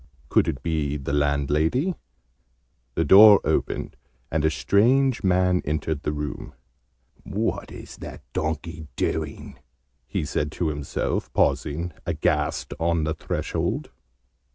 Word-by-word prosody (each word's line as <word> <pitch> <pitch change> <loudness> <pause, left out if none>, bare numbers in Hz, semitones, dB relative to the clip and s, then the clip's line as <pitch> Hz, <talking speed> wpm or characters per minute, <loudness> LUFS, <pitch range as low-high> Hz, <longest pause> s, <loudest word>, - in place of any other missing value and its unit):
Could - - +3
it 65 - -3
be 75 -3 -1
the 70 0 -4
landlady? 75 - +1 1.0
The 80 - +1
door 100 +4 +9
opened, - - -1 0.4
and 75 -1 0
a 80 - +4
strange 115 - +2
man 90 -1 +3
entered 75 0 -2
the - - -1
room. 75 0 -5 0.7
"What - - -3
is - - -10
that - - -9
donkey 80 +1 -3
doing?" 80 -3 -3 0.5
he 75 - -2
said 75 +1 -2
to 85 - -1
himself, 75 -2 -3
pausing, 80 +3 0
aghast, 80 -3 0
on 85 -1 +1
the 80 +1 0
threshold. 80 - -3
80 Hz, 120 wpm, -24 LUFS, 75-90 Hz, 1.0 s, door